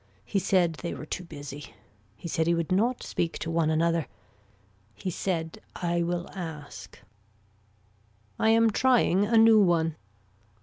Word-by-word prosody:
He 195 - 0
said 180 -3 +2
they 170 - -4
were - - -8
too 180 - -5
busy. 145 -6 -9 0.4
He 170 - -8
said 160 0 0
he 170 - +3
would 170 0 -3
not 230 +7 +1
speak 170 -1 -2
to 165 - -4
one 165 -1 +1
another. 165 0 +1 0.9
He 185 - -4
said 165 -3 -3 0.2
I 175 -1 -1
will 175 0 -2
ask. 160 -6 -8 1.4
I 220 - +3
am 225 0 +4
trying 210 -6 +3
a 230 +1 +3
new 225 -1 +7
one. 165 -4 +2
170 Hz, 145 wpm, -27 LUFS, 160-195 Hz, 1.4 s, new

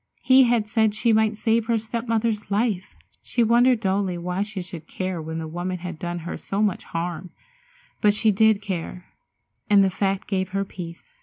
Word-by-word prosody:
He 260 0 +7
had 235 -3 +2
said 220 -1 +2
she 225 +1 +2
might 220 0 +2
save 225 0 +1
her 230 -1 +2
step 230 +2 -4
mother's 225 -2 0
life. 205 -2 -1 0.3
She 240 - 0
wondered 240 +1 +4
dully 190 -2 0
why 180 +2 -3
she 205 -2 -4
should 170 -3 -10
care 185 -3 -3
when 160 +1 -5
the 160 -1 -4
woman 175 +3 -3
had 175 -2 -7
done 175 0 -3
her 175 - -4
so 200 +2 -2
much 205 -4 -1
harm, 175 +1 -4 0.7
but 205 -1 +4
she 215 0 +3
did 215 0 +3
care, 180 -2 -5 0.6
and 200 -1 +6
the 190 - +2
fact 195 +1 -1
gave 190 -2 -1
her 195 +1 -1
peace. 170 -3 -8
200 Hz, 190 wpm, -24 LUFS, 180-220 Hz, 0.7 s, He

